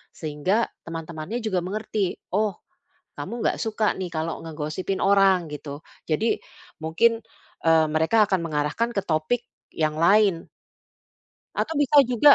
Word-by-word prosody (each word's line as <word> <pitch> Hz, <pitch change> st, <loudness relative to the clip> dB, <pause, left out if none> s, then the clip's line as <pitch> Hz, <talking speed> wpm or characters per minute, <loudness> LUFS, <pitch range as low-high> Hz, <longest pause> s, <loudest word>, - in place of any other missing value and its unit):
sehingga 160 Hz, +9 st, 0 dB, 0.2 s
teman-temannya 165 Hz, +7 st, -5 dB
juga 190 Hz, -4 st, 0 dB
mengerti, 200 Hz, +1 st, -2 dB, 0.2 s
"Oh, 205 Hz, 0 st, +1 dB, 0.6 s
kamu 220 Hz, +11 st, -4 dB
gak -, -, +2 dB
suka 215 Hz, -1 st, +1 dB
nih 185 Hz, -1 st, -3 dB
kalau 160 Hz, 0 st, -3 dB
ngegosipin 160 Hz, +4 st, -3 dB
orang," 195 Hz, -3 st, +4 dB
gitu. 145 Hz, 0 st, -7 dB, 0.2 s
Jadi 210 Hz, +9 st, +1 dB, 0.4 s
mungkin, 170 Hz, +9 st, +2 dB, 0.5 s
eee, 160 Hz, -1 st, +5 dB
mereka 160 Hz, +8 st, +4 dB
akan 190 Hz, -2 st, +1 dB
mengarahkan 155 Hz, +9 st, 0 dB
ke 200 Hz, -, 0 dB
topik 165 Hz, +8 st, 0 dB, 0.3 s
yang 155 Hz, -1 st, 0 dB
lain. 195 Hz, 0 st, +4 dB, 1.1 s
Atau 320 Hz, -, -1 dB
bisa 290 Hz, 0 st, +6 dB
juga, 255 Hz, +4 st, +6 dB
185 Hz, 125 wpm, -25 LUFS, 160-215 Hz, 1.1 s, bisa